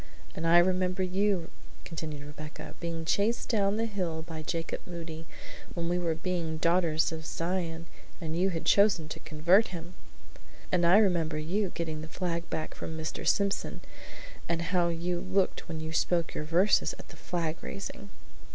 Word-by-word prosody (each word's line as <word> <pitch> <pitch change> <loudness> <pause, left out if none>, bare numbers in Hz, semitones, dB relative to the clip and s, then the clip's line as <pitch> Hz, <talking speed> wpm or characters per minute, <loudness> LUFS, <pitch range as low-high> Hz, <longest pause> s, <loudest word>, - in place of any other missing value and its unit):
"And 165 - -2
I 170 +1 +7
remember 185 +1 +3
you," 185 -1 +1 0.3
continued 155 -3 -5
Rebecca, 150 +1 -8
"being 165 -1 -3
chased 210 +7 +1
down 205 -3 +2
the 225 - +1
hill 180 -7 -2
by 160 -1 -6
Jacob 165 +1 -3
Moody, 165 -2 -6 0.5
when 170 -1 -1
we 175 +1 +1
were 165 -2 0
being 165 -2 -2
Daughters 165 -1 +3
of 160 0 -5
Zion 165 0 -2 0.3
and 160 -2 -3
you 185 +3 +3
had 165 -3 -3
been - - +6
chosen 200 -6 +4
to - - -5
convert 175 +8 +4
him!" 175 0 -7 0.8
"And 175 -2 +4
I 180 +4 +8
remember 170 -7 +3
you, 185 +6 0
getting 160 -2 -3
the 160 - -6
flag 170 0 -3
back 155 -1 -3
from 160 - -6
Mr. 155 0 -4
Simpson; 200 -1 +1 0.7
and 170 0 +1
how 175 -1 +4
you 170 +1 -1
looked 185 0 0
when 160 -1 -3
you 160 0 -4
spoke 170 +1 +1
your 150 - -3
verses 175 +6 +3
at - - -12
the - - -12
flag 165 -2 -2
raising." 200 0 -6
170 Hz, 170 wpm, -30 LUFS, 160-185 Hz, 0.8 s, I